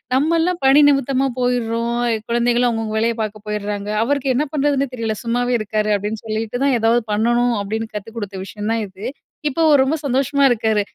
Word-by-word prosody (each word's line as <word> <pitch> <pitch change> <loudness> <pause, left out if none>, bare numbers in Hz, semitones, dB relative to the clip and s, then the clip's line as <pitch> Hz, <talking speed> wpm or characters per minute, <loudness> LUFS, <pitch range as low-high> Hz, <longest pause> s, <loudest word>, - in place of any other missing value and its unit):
"நம்மல்லாம் 330 +5 +1
பணி 270 +2 +6
நிமித்தமா 275 -1 +1
போய்டுறோம். 235 -1 0 0.3
குழந்தைங்களும் 240 +1 +2
அவங்கவங்க 225 -1 -3
வேலைய 230 +1 +1
பாக்க 215 0 -4
போயிட்றாங்க. 205 -1 -3
அவருக்கு 270 +1 0
என்ன 295 +4 +1
பண்றதுன்னே 280 -1 +1
தெரியல, 225 -3 -2
சும்மாவே 245 +1 0
இருக்காரு." 215 0 -1
அப்படீன்னு 210 +2 -4
சொல்லிட்டு 225 +3 -3
தான், 275 -2 +3
"எதாவது 230 +2 +3
பண்ணணும்." 240 +3 +2
அப்டீன்னு 220 +2 -4
கத்து 210 +2 -5
குடுத்த 200 -3 -5
விஷயம் 210 +2 -4
தான் 225 -1 -1
இது. 190 +3 -10 0.4
இப்போ 325 +4 -2
அவரு 290 -3 +5
ரொம்ப 285 +4 0
சந்தோஷமா 275 +2 +1
இருக்காரு. 220 -3 +1
235 Hz, 170 wpm, -19 LUFS, 215-270 Hz, 0.4 s, பணி